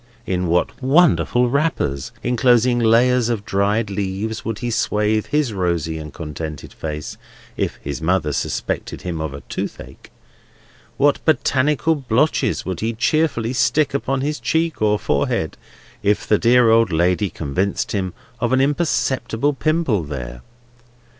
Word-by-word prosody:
In 90 -1 -1
what 85 +8 0
wonderful 135 -3 +3
wrappers, 125 - -1
enclosing 120 0 +3
layers 120 +1 +3
of 110 -4 -2
dried 100 +3 0
leaves, 100 +3 -3
would 115 -2 -3
he 120 +1 -3
swathe 110 -1 0
his 150 -6 0
rosy 85 -4 -1
and 75 -1 -8
contented 75 -1 -7
face, 75 -1 -6 0.4
if - - -2
his 70 0 -4
mother 80 -3 +1
suspected - - -3
him 85 -3 -3
of 80 -2 -3
a 70 +1 -8
toothache! - - -7 0.9
What 145 0 +2
botanical 150 +1 +2
blotches 140 +1 0
would 95 -2 -3
he 115 +1 -1
cheerfully 125 -1 0
stick 125 +5 +2
upon 135 -1 -1
his 150 +2 -2
cheek, 160 -5 -1
or 105 -1 +3
forehead, - - -1 0.5
if 105 +1 +1
the 105 - +3
dear 120 -1 +5
old 115 -2 +4
lady 90 +5 +1
convicted 90 +7 -2
him 95 -3 -2 0.2
of 120 0 0
an 130 - +4
imperceptible 140 -3 0
pimple 155 - +1
there! 65 -4 -6
110 Hz, 140 wpm, -20 LUFS, 90-130 Hz, 0.9 s, dear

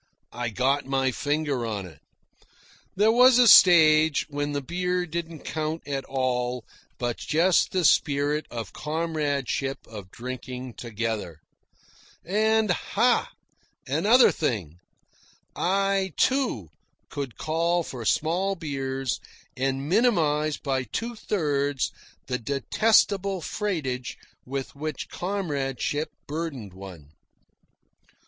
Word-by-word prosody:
I 120 0 -3
got 130 +5 0
my 135 -1 +1
finger 145 -2 -1
on 105 -4 -3
it. 80 -5 -13 1.0
There 210 +3 +4
was 250 +1 +6
a 250 -1 +6
stage 160 -5 +7
when 145 0 -2
the 145 - -1
beer 180 +3 -1
didn't 165 -1 -5
count 155 +1 -4
at 135 -2 -3
all, 125 -2 -1 0.3
but 120 -1 -2
just 170 +3 +2
the 185 -2 +1
spirit 145 +1 +2
of 115 -4 -6
comradeship 150 -4 -2
of 105 -4 -10
drinking 125 +2 -7
together. 110 -9 -4 0.8
And, 215 +2 +2
ha! 235 +7 +1 0.6
another 240 +5 +5
thing! 90 - -3 0.8
I, 195 -1 +1
too, 255 - +1 0.4
could 140 -4 -5
call 170 +2 0
for 125 -6 -7
small 175 - +1
beers 135 -5 -3 0.4
and 135 +1 -1
minimise 155 -8 +2
by 135 -2 -1
two 230 - -4
thirds 145 - -1 0.3
the 125 -1 -2
detestable 195 - +2
freightage 155 - -3 0.3
with 135 0 -4
which 150 -1 -5
comradeship 150 -5 -2 0.2
burdened 145 - -5
one. 90 -6 -11
145 Hz, 105 wpm, -26 LUFS, 130-180 Hz, 1.0 s, stage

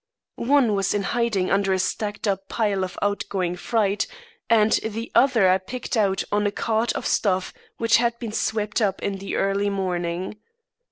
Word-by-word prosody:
"One 250 -3 +3
was 195 0 0
in 205 - 0
hiding 220 -4 0
under 195 -1 +2
a - - +2
stacked 205 +3 -2
up 195 -1 -2
pile 205 -4 0
of 185 - -5
outgoing 195 -3 -1
freight, 205 +1 0 0.4
and 220 -1 +4
the 225 +2 -4
other 245 -7 +4
I 185 +1 +4
picked 245 +7 -5
out 200 -3 +2
of 205 0 +2
a 205 - +1
cart 225 +2 0
of - - -4
stuff 190 -3 +1 0.2
which 230 -1 +4
had 235 0 +1
been 230 -3 -5
swept 215 0 -1
up 195 -3 0
in 195 -1 -2
the 195 - -4
early 195 +1 +1
morning. 185 0 -2
205 Hz, 175 wpm, -24 LUFS, 195-225 Hz, 0.4 s, and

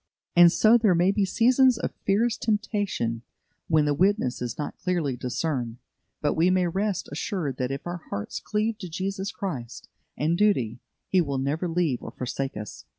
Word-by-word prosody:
And 175 -1 +8
so 225 +5 +5
there 210 -6 +4
may 175 +3 +4
be 200 0 +1
seasons 250 +5 +4
of - - -3
fierce 220 +4 +2
temptation 205 - -1 0.5
when 155 -2 +3
the 145 - +2
witness 180 - +1
is 120 -2 -4
not 150 - -4
clearly 170 -8 -1
discerned; 125 -1 -2 0.4
but 145 - +1
we 165 +3 +3
may 185 -1 +3
rest 195 +2 -1
assured 155 - -3
that 125 -1 -1
if 135 0 -5
our 175 0 -5
hearts 100 - -4
cleave 215 +1 -1
to 185 -5 -7
Jesus 195 +4 -3
Christ 130 - -6 0.3
and 155 +3 +1
duty, 130 - +1 0.3
He 185 - +3
will 140 -4 -2
never 145 +6 -1
leave 165 -6 0
or - - -7
forsake 130 0 -4
us. 105 -1 -8
175 Hz, 175 wpm, -26 LUFS, 135-200 Hz, 0.5 s, And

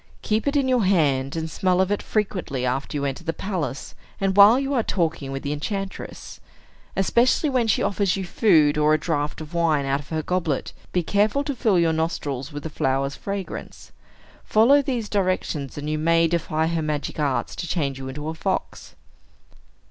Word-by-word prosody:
Keep 220 +5 0
it 280 - +1
in 275 -2 +2
your 250 -3 +2
hand, 145 -8 +2
and 160 0 -2
smell 180 +3 0
of 190 +1 +2
it 205 - 0
frequently 180 - -2
after 135 +4 -2
you 140 - -2
enter 135 +4 -3
the 165 -1 -2
palace, 175 -9 -4 0.3
and 195 -1 0
while 205 +5 +8
you 275 +1 -2
are 250 - +3
talking 165 -9 -1
with 135 0 -5
the 145 - -2
enchantress. 195 +6 -5 0.6
Especially 240 - +2
when 250 -3 +1
she 220 - +2
offers 200 -1 +1
you 190 - -3
food, 160 -7 +3
or 150 +1 +4
a - - -1
draught 150 -1 -2
of 155 +2 -9
wine 160 -4 +2
out 135 +1 0
of 145 - -12
her 160 -1 -2
goblet, 170 -6 -1 0.2
be 180 - 0
careful 210 - +1
to 285 -1 -2
fill 220 -6 +2
your 165 -1 +3
nostrils 150 -4 -2
with 145 0 -7
the 160 - -4
flower's 135 0 0
fragrance. 200 -1 -6 0.5
Follow 245 +7 +5
these 250 -6 -2
directions, 185 -9 -1
and 145 0 -5
you 155 0 -1
may 165 +1 +3
defy 160 -1 0
her 165 0 -1
magic 150 0 -3
arts 140 -3 -1
to 170 - -5
change 140 -5 -1
you 135 - -6
into 145 +3 -6
a 160 - -2
fox." 160 - -4
165 Hz, 195 wpm, -23 LUFS, 145-200 Hz, 0.6 s, while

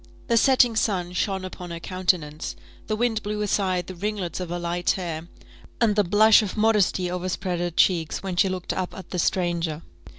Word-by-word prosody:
The 235 - +3
setting 245 -1 +4
sun 185 -5 0
shone 190 0 -1
upon 180 -1 -8
her 170 0 -5
countenance, 175 -4 -1 0.3
the 215 - 0
wind 225 -1 0
blew 210 0 -3
aside 185 -3 0
the 185 - -7
ringlets 190 -2 -3
of 180 -2 -5
her 175 - -2
light 175 0 -2
hair, 170 -3 -2 0.5
and 225 -3 +3
the 210 - +4
blush 215 +4 +6
of 210 0 -4
modesty 210 -4 +2
overspread 180 0 -2
her 175 0 -1
cheeks 170 -1 +1
when 190 -2 -3
she 190 +2 +3
looked 185 -1 -3
up 185 -1 -4
at 190 - -10
the 180 - -2
stranger. 170 -3 0
185 Hz, 190 wpm, -24 LUFS, 175-210 Hz, 0.5 s, blush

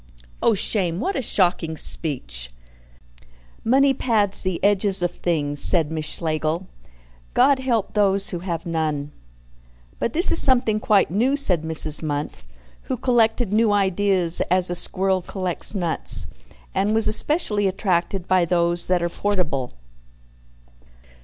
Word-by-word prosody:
"Oh, 225 - +3
shame! 185 -4 -1
What 385 - -2
a - - -1
shocking 175 -7 0
speech!" 95 - -2 1.1
"Money 270 +4 +3
pads 215 -6 0
the 185 -2 -2
edges 200 -2 +1
of 175 - 0
things," 145 -5 -2
said 165 -4 +2
Miss 155 -1 -3
Schlegel. 160 +2 -2 0.7
"God 280 -2 +4
help 235 -6 -1
those 200 -1 +1
who 175 - -5
have 170 -1 -5
none." 155 -3 -3 0.9
"But 235 - -2
this 345 +4 +2
is - - +4
something 245 -5 +2
quite 205 -5 +2
new!" 245 +9 +1
said 190 - +1
Mrs. 155 -1 0
Munt, 145 -2 -3 0.6
who - - -1
collected 230 -3 +1
new 220 0 +3
ideas 190 -3 +1
as 180 0 +1
a - - -2
squirrel 190 +1 +1
collects 185 +2 -4
nuts, 170 -4 +5 0.5
and 200 +3 0
was 225 - +5
especially 215 - +1
attracted 185 -1 -2
by 185 -1 +3
those 170 0 0
that 180 -1 +1
are 170 - -1
portable. 170 -10 -2
185 Hz, 135 wpm, -22 LUFS, 170-210 Hz, 1.1 s, nuts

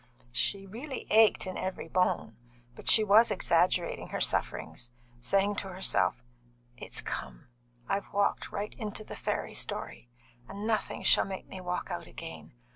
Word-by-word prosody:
She 195 +11 0
really 255 +8 -6
ached 220 -1 +6
in 185 0 -4
every 185 -3 -3
bone, 180 -10 +1 0.4
but - - -4
she 220 - +7
was 215 +3 +6
exaggerating 175 +1 +2
her - - -3
sufferings, 120 - -1 0.3
saying 195 +10 +2
to 195 - -3
herself: 185 - +1 0.5
"It's - - -2
come! 65 - -5 0.4
I've 195 0 -2
walked 200 0 +1
right 210 +1 -3
into 215 -1 -5
the - - -8
fairy - - -2
story, 120 - -4 0.4
and 200 +2 -6
nothing 220 -1 -1
shall - - +5
make 190 -1 -6
me 190 - -8
walk 180 0 -3
out - - -4
again. - - -9
195 Hz, 150 wpm, -30 LUFS, 180-210 Hz, 0.5 s, she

